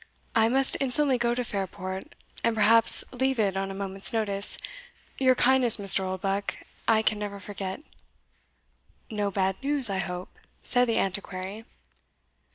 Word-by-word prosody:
"I 225 0 +3
must 265 +2 +2
instantly 270 -1 +1
go 240 0 -1
to 250 - -3
Fairport, 190 -3 -7 0.3
and 230 -1 0
perhaps 225 +1 +5
leave 265 +1 -1
it 200 -3 0
on 195 0 -3
a 195 - -7
moment's 195 0 -4
notice; 205 -3 +4 0.6
your 260 -1 +3
kindness, 250 -2 +4
Mr. 195 -2 +5
Oldbuck, 195 +2 -3 0.3
I 220 -1 +2
can 215 -1 0
never 205 -1 -6
forget." 195 +4 -7 1.3
"No 205 -2 -2
bad 190 -1 -2
news, 275 -5 +4
I 190 - -3
hope?" 180 -1 -6 0.3
said 245 -1 +1
the 230 - -1
Antiquary. 195 +2 -5
210 Hz, 145 wpm, -25 LUFS, 195-240 Hz, 1.3 s, perhaps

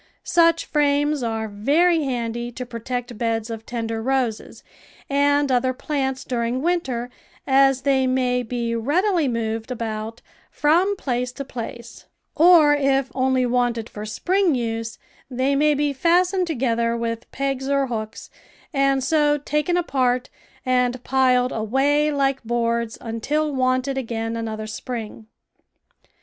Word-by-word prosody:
Such 335 -1 +3
frames 290 0 +1
are 225 -2 -2
very 300 +12 +2
handy 240 -2 -3
to 250 +1 -6
protect 245 0 -5
beds 230 -1 -1
of 225 -1 -7
tender 225 -2 -3
roses 255 -3 -2 0.5
and 285 0 +2
other 255 +1 +2
plants 265 -1 -2
during 245 +1 -2
winter, 265 -9 -1 0.3
as 270 -1 +3
they 265 -2 +2
may 250 -1 +1
be 235 -1 -3
readily 330 - +1
moved 225 -1 -2
about 225 -2 -5 0.3
from 350 +7 +2
place 250 -7 -2
to 275 - -6
place, 235 -2 -8 0.3
or 320 -3 +6
if 275 -2 +1
only 260 -1 +1
wanted 240 -2 0
for 210 - -8
spring 360 - +1
use, 230 -1 -3 0.3
they 260 +2 0
may 300 +1 +3
be 290 0 0
fastened 355 +5 +2
together 235 -5 0
with 230 0 -4
pegs 270 0 -2
or 280 -1 +2
hooks, 220 -4 -6 0.4
and 275 -1 +2
so 295 +1 +2
taken 300 +4 -1
apart 255 -7 0 0.3
and 250 -1 +1
piled 255 -1 +2
away 275 +7 +1
hke 275 -2 +1
boards 235 -1 -1
until 290 +7 -2
wanted 255 +1 0
again 225 -2 -3
another 220 -1 -4
spring. 220 -1 -6
255 Hz, 130 wpm, -22 LUFS, 235-285 Hz, 0.5 s, or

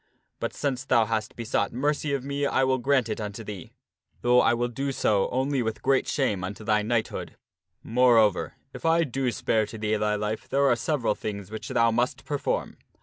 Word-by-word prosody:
But - - -2
since 130 -3 -2
thou 115 -4 +3
hast 110 0 -2
be 115 - -6
sought 100 -2 0
mercy 145 +3 -1
of 140 -2 -1
me 140 +1 -1
I 130 - +2
will 130 0 +2
grant 130 -1 +2
it 110 0 -3
unto 105 +1 -5
thee, 100 -5 -8 0.5
though 125 +1 +5
I 120 - +3
will 120 +1 0
do 135 +4 -4
his 135 - -2
injunctions - - -6
so 100 -2 +3
only 135 +1 0
with 110 -2 -3
great 135 0 +2
shame 105 -10 0
unto 100 +4 -6
thy 105 0 +2
knighthood. 110 +1 -2 0.5
Moreover, 115 -4 +3
\{ - - -44
upon 165 +1 +2
the 145 - -6
fad 135 +1 -1
I - - +4
spare 110 -1 0
to 110 - -8
thee 110 0 0
thy 105 0 +1
life 105 +1 -3
there 140 +1 +2
are 120 - +4
several 120 -1 0
things 100 -2 -6
which 110 - -6
thou 115 0 +3
must 125 +4 -1
perform. 145 -2 -2
120 Hz, 220 wpm, -26 LUFS, 110-135 Hz, 0.5 s, though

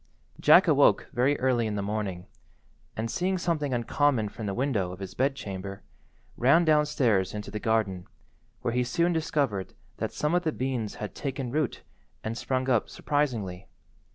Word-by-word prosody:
Jack - - +7
awoke - - +4
very 135 +4 +2
early 125 -3 +2
in 105 - -2
the 100 - -2
morning, 100 -3 -3 0.7
and 115 +1 -2
seeing 185 +1 0
something 160 -5 -1
uncommon 120 -1 +1
from 105 0 -6
the 100 - -2
window 115 -9 0
of 90 - -8
his 95 -1 -7
bed–chamber, 100 -8 -3 0.5
ran 145 +8 +5
downstairs 140 - +2
into 105 -1 -6
the 105 - -4
garden, 105 -5 0 0.6
where 115 - 0
he 125 0 +2
soon 170 +8 +1
discovered 140 - -1 0.2
that - - -2
some 150 +2 -1
of 175 - +3
the 160 -3 0
beans 125 -6 -3
had 105 - -6
taken 135 -3 -4
root 150 -1 -1 0.4
and 110 +1 -3
sprung 130 +1 -1
up 120 -5 +2
surprisingly. 115 -11 -2
120 Hz, 160 wpm, -28 LUFS, 105-145 Hz, 0.7 s, Jack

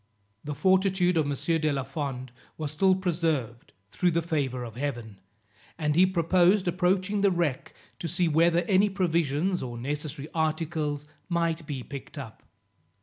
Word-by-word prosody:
The 150 0 -4
fortitude 185 0 +3
of 155 -3 +2
M. 140 -1 -2 0.2
de 155 -1 +2
la 135 -2 -1
Fond 135 -2 -5 0.3
was 155 -2 -4
still 190 +5 +3
preserved, 160 - -2 0.2
through 180 - +2
the 170 0 0
favour 140 -7 -1
of 115 -2 -8
Heaven, 120 -7 -4 0.6
and 150 -2 0
he 185 +3 +6
proposed 185 +2 +3
approaching 185 +3 +1
the 200 - +5
wreck, 170 -7 -1 0.2
to 170 - -3
see 175 +3 +1
whether 165 +2 +3
any 195 +3 +3
provisions 175 -2 0
or 120 -2 -5
necessary 145 +3 -4
articles 155 -2 -1 0.2
might 165 -2 -1
be 135 -4 -4
picked 140 +2 -9
up. 125 -6 -8
160 Hz, 150 wpm, -27 LUFS, 140-180 Hz, 0.6 s, he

